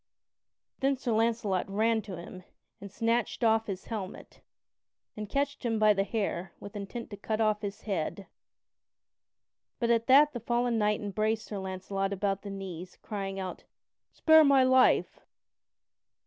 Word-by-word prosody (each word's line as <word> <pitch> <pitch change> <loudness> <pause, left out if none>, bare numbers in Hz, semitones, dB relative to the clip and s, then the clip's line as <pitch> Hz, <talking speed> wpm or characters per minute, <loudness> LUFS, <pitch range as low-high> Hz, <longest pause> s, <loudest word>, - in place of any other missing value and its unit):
Then 275 +1 +2
Sir 245 -2 -3
Launcelot 220 -4 0
ran 220 +3 +1
to 190 -3 -8
him 180 +2 -10 0.4
and 200 0 -9
snatched 230 +3 -1
off 225 -1 +3
his 190 -2 -5
helmet, 205 -5 -7 0.7
and 210 -1 -6
catched 285 +2 -1
him 230 -2 0
by 215 -1 +5
the 195 -1 +1
hair 195 -4 -3
with 200 - -10
intent 210 +4 -6
to 205 - -7
cut 215 +2 -3
off 215 -1 +2
his 205 -1 -5
head. 195 0 -3 1.5
But 235 -1 +1
at 230 0 +2
that 290 +3 +6
the 240 - -4
fallen 240 0 0
knight 210 0 +1
embraced 215 +2 -1
Sir 205 - -5
Launcelot 190 +1 -3
about 195 0 -1
the 205 - -8
knees, 185 -2 -7
crying 195 -2 -4
out: 185 -1 -6 0.5
"Spare 315 0 +6
my 275 -2 +5
life!" 255 0 +3
215 Hz, 150 wpm, -29 LUFS, 195-235 Hz, 1.5 s, that